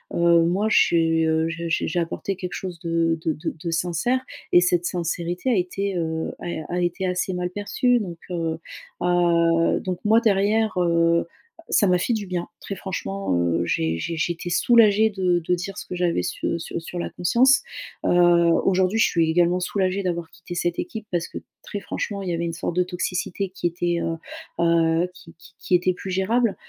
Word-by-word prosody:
heu, 170 0 +5
moi, 190 +6 +1
j'ai, 165 -5 +3
heu, 160 0 +1
j'ai 170 0 -4
j'ai 160 - 0
j'ai 175 +2 -1
apporté 170 +3 -3
quelque 180 -2 -5
chose 180 -3 -6
de 165 -1 0
de 160 - +1
de 155 +3 -4
de 170 - -2
sincère 175 +10 0 0.3
et 175 - +7
cette 175 -1 +2
sincérité 175 +5 -2
a 235 - +3
été, 195 +2 -1
heu, 160 -1 -2
a 170 -1 -5
a 180 - 0
été 175 +2 -1
assez 180 +1 -1
mal 180 0 -2
perçue. 240 +5 +1
Donc, 175 -5 -5
heu, 165 -2 -2 0.5
heu 170 -1 +3
donc, 185 -2 -3
moi, 225 +2 +5
derrière, 215 0 +2
heu, 170 -1 +2 0.4
ça 205 - +4
m'a 180 - +4
fait 240 - 0
du 210 -3 -3
bien, 180 -1 -3
très 200 - -5
franchement, 100 - -3
heu, 85 0 +1
j'ai 80 -1 0
j'ai 165 - -4
j'étais 170 +1 -2
soulagée 220 +1 +5
de 185 -4 +1
de 175 +2 0
dire 195 +3 -6
ce - - -6
que 180 - -5
j'avais 175 - +1
su 170 - -2
sur 165 - -5
sur 175 +1 -6
la - - -3
conscience. 250 - +3 0.4
Heu, - - +2 0.6
aujourd'hui, 190 +3 +2
je - - +6
suis 165 -2 +1
également 175 +1 +3
soulagée 190 +1 0
d'avoir 170 -2 -2
quitté 175 +1 -10
cette 175 0 -1
équipe 215 +4 -5
parce 170 -1 -1
que, - - -6 0.2
très 205 - -5
franchement, 200 -2 -4
il 185 - -3
y - - 0
avait 170 0 -1
une 165 - -3
sorte 170 0 -4
de 180 - +4
toxicité 180 +1 -3
qui 185 -2 -2
était, 175 0 -1
heu, 165 0 -2 0.5
heu, 165 0 +3
qui 170 -2 -15
qui - - -16
qui 180 - +1
était 180 +1 +2
plus 190 +1 -7
gérable, 220 +4 +1
175 Hz, 200 wpm, -23 LUFS, 165-190 Hz, 0.6 s, et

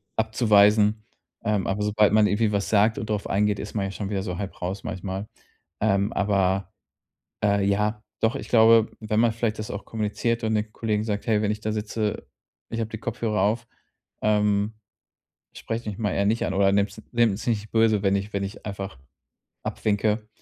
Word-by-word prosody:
abzuweisen. 105 -1 +4 0.4
Ähm, 105 -2 0
aber 100 +2 -1
sobald 105 0 +3
man 105 -1 +5
irgendwie 105 +1 +1
was 100 -1 -1
sagt 110 +1 +3
und 110 - -5
drauf 105 -2 -1
eingeht, 105 +1 +1
ist 105 - -6
man 100 -2 0
ja 95 - -4
schon 100 0 -5
wieder 100 -2 -1
so 90 -4 -4
halb 100 0 -6
raus 95 +2 -3
manchmal. 95 +2 -4 0.5
Ähm, 100 +2 +2
aber, 95 -2 +1 0.7
äh, 100 -1 +3
ja, 105 +2 0 0.2
doch, 115 +3 +2
ich - - -5
glaube, 115 -1 +6
wenn 110 0 0
man 115 0 +4
vielleicht 115 -1 -2
das 110 - -5
auch 100 - -6
kommuniziert 115 +2 -2
und 110 0 0
den 105 0 -1
Kollegen 105 -1 -1
sagt: 105 -2 -3
„Hey, 110 -2 +3
wenn 105 -1 +1
ich 105 - -3
da 110 - -2
sitze, 105 0 -3 0.4
ich 115 - -4
habe 110 -1 -2
die 110 - -4
Kopfhörer 110 -3 -1
auf, 115 +4 0 0.5
ähm, 105 0 +2 0.8
sprecht 115 +1 -5
mich 105 -2 -4
mal 105 -3 -1
eher 100 - +1
nicht 110 +3 +1
an - - -2
oder 95 0 +3
nehmt's 100 +2 0
nehmt's 115 -4 +1
nicht 110 -3 -1
böse, 110 -2 +3
wenn 100 0 +3
ich 100 +1 -3
wenn 100 0 -1
ich 100 +1 -7
einfach 100 -6 -5 0.7
abwinke.“ 105 +1 0
105 Hz, 190 wpm, -25 LUFS, 100-110 Hz, 0.8 s, glaube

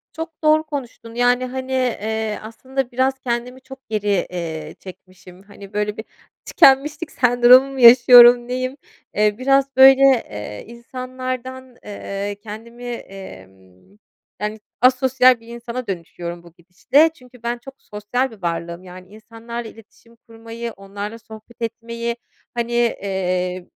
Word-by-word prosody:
Çok 325 -1 -8
doğru 310 0 +4
konuştun, 255 -6 -8
yani, 245 +1 +2
hani, 260 +1 -6
eee, 220 -4 -2
aslında 255 +4 -5
biraz 260 +2 +1
kendimi 250 +1 -4
çok 265 -1 -14
geri, 205 -3 0
eee, 160 -3 -6
çekmişim. 185 0 -14
Hani, 200 -1 -14
böyle, 210 0 -2
bir 220 - -7 0.4
tükenmişlik 295 +4 +3
sendromu 245 +2 +5
mu 270 - -7
yaşıyorum, 240 0 +8
neyim? 255 +2 -3 0.4
Eee, 210 0 +2
biraz 275 +1 +1
böyle, 265 0 +8 0.3
eee, 105 0 -7
insanlardan, 255 +1 -7
eee, 200 0 -5
kendimi, 230 +3 -10
emm, 95 - -11 0.4
yani 210 +1 -3 0.2
asosyal 255 0 +4
bir 230 - -19
insana 235 +1 -7
dönüşüyorum 175 -2 -6
bu 170 -1 -17
gidişle. 180 - +2
Çünkü 250 -5 -19
ben 240 +1 -2
çok 270 +3 -13
sosyal 220 +5 -3
bir 215 -3 -15
varlığım. 170 0 -4
Yani 185 0 -12
insanlarla 225 +2 -9
iletişim 225 +1 -19
kurmayı, 230 0 -9
onlarla 205 +2 -8
sohbet 220 +2 -15
etmeyi, 235 +1 -4 0.4
hani, 235 0 -3
eee, 185 -6 -1
235 Hz, 130 wpm, -20 LUFS, 200-255 Hz, 0.4 s, yaşıyorum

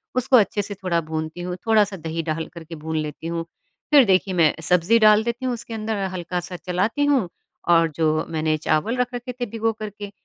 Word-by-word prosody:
उसको 255 0 +4
अच्छे 205 -1 +2
से 205 +1 -6
थोड़ा 185 -3 -1
भुनती 160 +2 -4
हूँ, 180 0 -4
थोड़ा-सा 210 -3 +3
दही 160 0 -4
डालकर 160 +1 -4
के 165 +1 -9
भून 160 +1 -4
लेती 155 +1 -4
हूँ। 165 0 -3 0.5
फिर 290 -2 +8
देखिए, 190 -1 +2
मैं 165 -4 +4
सब्ज़ी 180 +6 +3
डाल 215 0 +6
देती 235 +2 -3
हूँ 255 - 0
उसके 235 -1 -7
अंदर, 220 0 -2 0.2
हल्का-सा 180 0 -4
चलाती 190 +12 0
हूँ 265 -11 +2 0.4
और 165 -1 +5
जो 155 0 +1
मैंने 155 -1 0
चावल 155 +10 0
रख 250 0 -1
रखे 245 +1 -5
थे - - +1
भिगोकर 225 -1 -2
के, 205 0 -9
185 Hz, 200 wpm, -23 LUFS, 165-225 Hz, 0.5 s, फिर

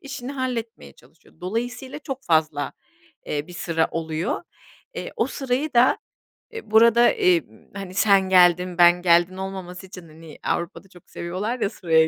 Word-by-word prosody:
işini 270 -1 -7
halletmeye 245 -4 -4
çalışıyor. - - -23
Dolayısıyla 245 +8 -4
çok 270 -3 -7
fazla, 155 -3 +1 0.5
eee, 145 0 -3
bir 180 - -12
sıra 165 -2 -1
oluyor. 160 - -3 0.5
Eee, - - -6
o - - +1
sırayı 270 +2 -2
da, 240 +2 +5 0.5
eee, 450 - -9
burada, 235 +2 +6
eee, 175 -2 +3
b 110 - -13
hani, 190 -2 -7
sen 195 -1 +3
geldin, 180 -1 +4
ben 175 0 +6
geldim 175 +1 +3
olmaması 190 -1 -7
için, 180 -2 -11
hani, 160 0 -14
Avrupa'da 170 +3 -3
çok 175 -2 -19
seviyorlar 195 +8 -4
ya 200 - 0
sıraya 160 -6 +2
185 Hz, 155 wpm, -23 LUFS, 170-240 Hz, 0.5 s, burada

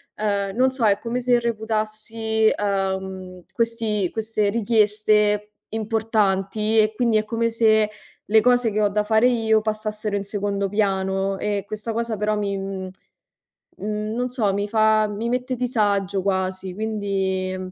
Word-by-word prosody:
ehm, 200 -2 -1
non 255 +2 +4
so, 255 -4 -1
è 200 -1 +3
come 240 +1 -3
se 245 -1 +3
reputassi, 220 0 0
uhm, 190 -2 -3
questi 230 -6 0
queste 220 -1 -1
richieste 210 -1 +2 0.2
importanti 215 -1 +1
e 215 0 +3
quindi 235 -2 +2
è 215 - 0
come 230 +1 0
se 220 -2 +3 0.3
le 220 +1 +4
cose 245 -1 +3
che 215 +1 0
ho 205 - +4
da 210 +1 0
fare 220 +3 +3
io 225 -3 +3
passassero 215 -1 -3
in 200 - -1
secondo 200 -1 -2
piano 195 -1 0
e 205 -1 -2
questa 215 +2 -4
cosa, 230 0 -2
però, 210 +1 0
mi 200 -1 -2
mhmm, 195 -1 -5 0.9
mhmm, 210 +1 -3
non 250 +1 -1
so, 220 -6 0
mi 205 +1 -1
fa 215 0 +3
mi 215 +3 -3
mette 250 +1 -1
disagio 205 -6 0
quasi, 190 -1 -2
quindi 195 -3 -2
215 Hz, 150 wpm, -23 LUFS, 200-225 Hz, 0.9 s, non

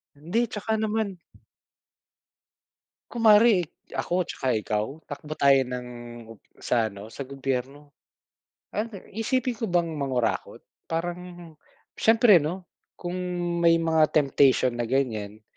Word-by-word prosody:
Hindi, 190 +11 -1
tsaka 220 +1 -2
naman 215 -4 -1 1.9
kunwari, 220 -4 +5 0.3
ako 180 0 -1
tsaka 130 - -4
ikaw? 105 0 -1 0.2
Takbo 150 +1 -8
tayo 135 -1 +5
ng, 125 0 -6 0.7
sa 115 -3 0
ano, 100 +2 -10
sa 125 +5 -7
gobyerno. 135 +2 -5 1.2
Iisipin 240 +2 -1
ko 225 - -3
bang 170 -2 +1
mangurakot? 130 -6 -2 0.2
Parang, 175 +2 -2 0.8
siyempre 225 -4 +6
'no, 175 +4 -5 0.2
kung 180 0 -5 0.4
may 170 -1 +5
mga 160 -2 +3
temptation 135 -3 +4
na 120 - -1
ganyan, 110 -5 -2
155 Hz, 105 wpm, -26 LUFS, 130-195 Hz, 1.9 s, siyempre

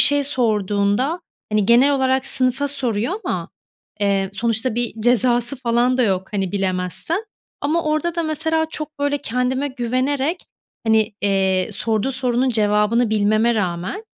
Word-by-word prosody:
şey 285 -1 +5
sorduğunda 215 - +1 0.3
hani, 210 -2 +2
genel 250 +5 +5
olarak 265 -1 +1
sınıfa 265 +2 +1
soruyor 250 - 0
ama, - - -3 0.5
eee, 195 -1 +1
sonuçta 230 +2 -1
bir 240 0 -2
cezası 245 +1 +2
falan 245 0 +1
da 255 - +2
yok, 190 -4 0
hani, 195 -3 -2
bilemezsen. 190 - -2 0.4
Ama 315 +4 0
orada 310 +2 0
da 340 - -1
mesela 320 0 0
çok, 305 -1 -7
böyle, 285 0 0
kendime 255 +3 -1
güvenerek 265 +5 -1 0.4
hani, 220 -1 +2
eee, 190 -1 +1
sorduğu 220 +4 0
sorunun 255 0 +1
cevabını 215 +1 +2
bilmeme 215 +2 +2
rağmen, 185 - -3
240 Hz, 135 wpm, -20 LUFS, 210-280 Hz, 0.5 s, şey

